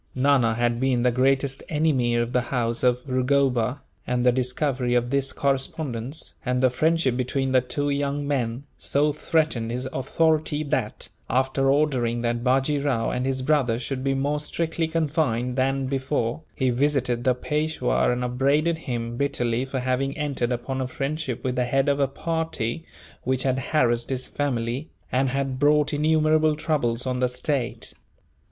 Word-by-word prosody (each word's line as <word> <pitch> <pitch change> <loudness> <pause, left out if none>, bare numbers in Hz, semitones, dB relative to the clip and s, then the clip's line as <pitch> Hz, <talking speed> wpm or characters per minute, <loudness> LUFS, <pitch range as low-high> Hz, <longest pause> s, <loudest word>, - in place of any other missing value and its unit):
Nana 130 -4 +3
had 120 0 0
been 130 -2 +1
the 125 - +4
greatest 135 +2 +1
enemy 150 -6 +1
of 120 +1 0
the 125 - +3
house 120 -1 -1
of 125 +1 +1
Rugoba; 130 0 +1 0.3
and 125 0 0
the 125 - +6
discovery 125 0 0
of 120 0 +1
this 140 -1 +1
correspondence, 135 -1 -2
and 125 -1 0
the 130 - +5
friendship 155 0 +1
between 130 +1 -1
the 130 -1 +4
two 145 +3 -1
young 140 0 -1
men, 125 -3 -1 0.2
so 145 +1 +2
threatened 155 -7 0
his 125 +2 -3
authority 155 +2 +1
that, 135 -7 -2 0.2
after 135 +2 +1
ordering 130 -5 +1
that 120 0 -1
Bajee 135 +3 +2
Rao 115 -6 0
and 125 +1 -1
his 130 -1 -1
brothers 130 -5 +1
should 130 0 -4
be 135 0 +1
more 145 +2 0
strictly 165 +2 -2
confined 150 -7 0
than 135 +1 +1
before, 130 -1 -1
he 130 -2 +1
visited 130 -2 +1
the 130 -2 +3
Peishwa 150 - 0
and 125 0 -1
upbraided 140 +7 +1
him 120 -5 -4
bitterly 125 -3 0
for 130 -1 -3
having 130 +2 -1
entered 140 -5 -1
upon 130 +2 -2
a 130 - -1
friendship 135 -1 -3
with 125 -1 -1
the 125 - +1
head 135 +3 +1
of 140 0 +2
a 140 - +3
party 160 -3 -3 0.4
which 130 0 0
had 130 -1 +1
harassed 120 -4 +1
his 130 -1 -2
family, 130 0 -2 0.2
and 130 +1 +2
had 135 0 -2
brought 150 +1 +3
innumerable 155 +1 +3
troubles 145 -7 -1
on 130 -1 -1
the 125 0 +2
state. 125 0 -2
130 Hz, 165 wpm, -24 LUFS, 125-145 Hz, 0.4 s, the